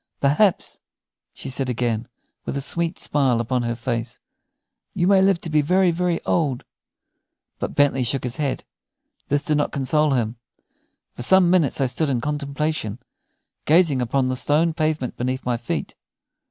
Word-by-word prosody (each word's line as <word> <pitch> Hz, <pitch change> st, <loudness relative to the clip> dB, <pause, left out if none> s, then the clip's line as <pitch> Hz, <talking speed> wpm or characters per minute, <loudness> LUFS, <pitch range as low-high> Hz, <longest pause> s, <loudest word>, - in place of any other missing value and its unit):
"Perhaps," 150 Hz, +8 st, +2 dB, 0.5 s
she -, -, -8 dB
said 130 Hz, 0 st, -2 dB
again, 120 Hz, -2 st, -1 dB, 0.4 s
with -, -, -4 dB
a -, -, 0 dB
sweet 170 Hz, +5 st, -1 dB
smile 135 Hz, -5 st, +1 dB
upon 125 Hz, +2 st, -1 dB
her 120 Hz, 0 st, -2 dB
face, 115 Hz, 0 st, -4 dB, 0.8 s
"you 175 Hz, -2 st, +1 dB
may 195 Hz, 0 st, +5 dB
live 190 Hz, -2 st, +3 dB
to 165 Hz, -, -4 dB
be 155 Hz, -1 st, +4 dB
very, 180 Hz, +4 st, +3 dB
very 175 Hz, 0 st, 0 dB
old." 145 Hz, -7 st, 0 dB, 1.0 s
But -, -, -4 dB
Bentley 145 Hz, -2 st, +3 dB
shook 130 Hz, +2 st, 0 dB
his 125 Hz, 0 st, -3 dB
head. 140 Hz, -3 st, -2 dB, 0.6 s
This 145 Hz, 0 st, +1 dB
did 150 Hz, -, +1 dB
not 145 Hz, -, 0 dB
console 145 Hz, +2 st, +1 dB
him. 120 Hz, -2 st, -1 dB, 0.8 s
For -, -, -8 dB
some 180 Hz, +6 st, +5 dB
minutes 170 Hz, -8 st, +2 dB
I 135 Hz, -, +2 dB
stood 135 Hz, +5 st, -1 dB
in 130 Hz, -3 st, 0 dB
contemplation, 145 Hz, -4 st, -2 dB, 0.7 s
gazing 155 Hz, -4 st, +4 dB
upon 130 Hz, +2 st, 0 dB
the 130 Hz, 0 st, -1 dB
stone 155 Hz, +5 st, +2 dB
pavement 155 Hz, -5 st, -1 dB
beneath 130 Hz, +2 st, -2 dB
my 125 Hz, -1 st, +1 dB
feet. 115 Hz, 0 st, -4 dB
140 Hz, 160 wpm, -22 LUFS, 125-160 Hz, 1.0 s, may